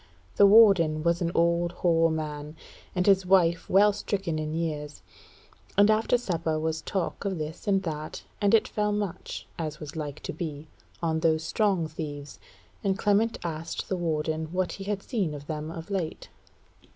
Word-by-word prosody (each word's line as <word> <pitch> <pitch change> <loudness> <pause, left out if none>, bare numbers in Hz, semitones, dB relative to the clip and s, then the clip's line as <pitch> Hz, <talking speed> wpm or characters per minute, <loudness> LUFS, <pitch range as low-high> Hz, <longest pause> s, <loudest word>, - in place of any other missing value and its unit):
The 200 - +8
warden 195 -8 +6
was 170 +1 +1
an 170 -1 0
old 170 +1 +2
hoar 165 -2 +3
man, 150 -1 -4 0.4
and 180 0 +1
his 195 -1 +5
wife 180 -2 +3
well 205 +2 +5
stricken 195 -5 -2
in 155 0 -3
years; 150 - -4 0.7
and 205 +1 +6
after 220 +3 +3
supper 165 -8 -1
was 160 0 -2
talk 190 +3 -3
of 195 -3 -2
this 155 +4 -6
and 195 -1 +2
that, 155 -3 -5 0.2
and 205 +2 +5
it 220 - +3
fell 210 0 0
much, 205 -4 -4
as 155 -2 -4
was 150 +1 -8
like 150 -2 -5
to - - -5
be, 155 -4 -6 0.4
on 160 -1 +1
those 160 -1 +2
strong 195 -3 +1
thieves, 145 -3 -7 0.4
and 195 -2 +1
Clement 210 +3 +2
asked 165 -1 -4
the 190 - 0
warden 160 -2 -1
what 185 0 0
he 195 - -7
had 200 -1 -2
seen 195 - -2
of 145 0 -9
them 155 0 -4
of 165 +3 -8
late. 180 -5 -3
170 Hz, 175 wpm, -27 LUFS, 155-195 Hz, 0.7 s, The